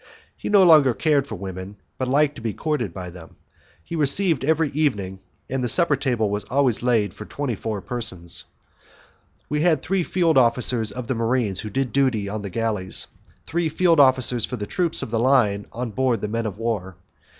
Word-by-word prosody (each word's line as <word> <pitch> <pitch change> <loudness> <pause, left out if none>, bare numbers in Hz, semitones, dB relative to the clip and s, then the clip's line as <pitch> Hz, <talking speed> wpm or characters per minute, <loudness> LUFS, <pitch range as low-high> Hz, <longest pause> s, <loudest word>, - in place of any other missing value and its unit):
He - - -6
no 200 -2 +6
longer 150 -8 +6
cared 145 -3 +1
for 110 - -5
women, 95 +1 -7 0.2
but 130 - -1
liked 145 +2 +2
to - - -9
be 110 -2 -2
courted 150 - -2
by 90 +1 -7
them. 85 -2 -13 0.5
He 170 - -6
received 155 0 +2
every 160 +1 +1
evening, 100 -11 -1 0.3
and 130 0 -2
the 120 - 0
supper 170 -1 +3
table 125 -5 0
was 105 -1 -2
always 130 -1 +1
laid 115 -6 +1
for 105 - -9
twenty 140 0 -3
four 105 0 -4
persons. 95 -9 -5 1.0
We 150 0 -1
had 160 -4 +2
three 195 -1 0
field 165 -5 +2
officers 120 -2 +1
of 125 -1 -6
the 130 - -1
marines 115 -4 0
who 110 - -5
did 125 +2 -2
duty 130 -7 +1
on 105 +1 -4
the 100 - -5
galleys, 105 -2 -1 0.3
and - - -39
three 170 0 -1
field 165 0 +3
officers 130 -3 +4
for 125 - -3
the 105 - -4
troops 170 - -1
of - - -7
the 115 - 0
line 115 -6 +2
on 120 -1 -4
board 120 -1 0
the - - -2
men 115 +1 -2
of 100 -2 -6
war. 105 -5 -3
125 Hz, 200 wpm, -23 LUFS, 105-145 Hz, 1.0 s, no